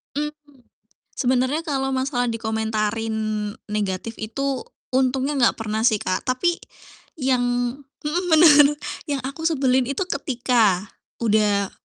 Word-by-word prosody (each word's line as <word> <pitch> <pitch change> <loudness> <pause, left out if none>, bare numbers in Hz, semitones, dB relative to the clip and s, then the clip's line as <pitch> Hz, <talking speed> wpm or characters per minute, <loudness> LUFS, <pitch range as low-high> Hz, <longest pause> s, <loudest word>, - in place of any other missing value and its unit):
Mmm, 295 -2 -6 0.6
sebenarnya 260 +4 +1
kalau 270 -4 -1
masalah 260 -2 0
dikomentarin 220 -1 -1 0.6
negatif 210 +1 -2
itu 260 +4 -3 0.3
untungnya 265 +2 +1
enggak 235 - +3
pernah 220 0 -2
sih 215 -4 +2
Kak, 185 - -2
tapi 340 +8 +1 0.6
yang 255 -2 +2 0.6
mhm, 320 +5 -1
bener. 295 -2 +7 0.3
Yang 280 -3 -2
aku 280 +4 -8
sebelin 265 -5 +2
itu 280 +7 -1
ketika 240 - +1 0.4
udah 210 -3 +2
255 Hz, 110 wpm, -23 LUFS, 220-280 Hz, 0.6 s, bener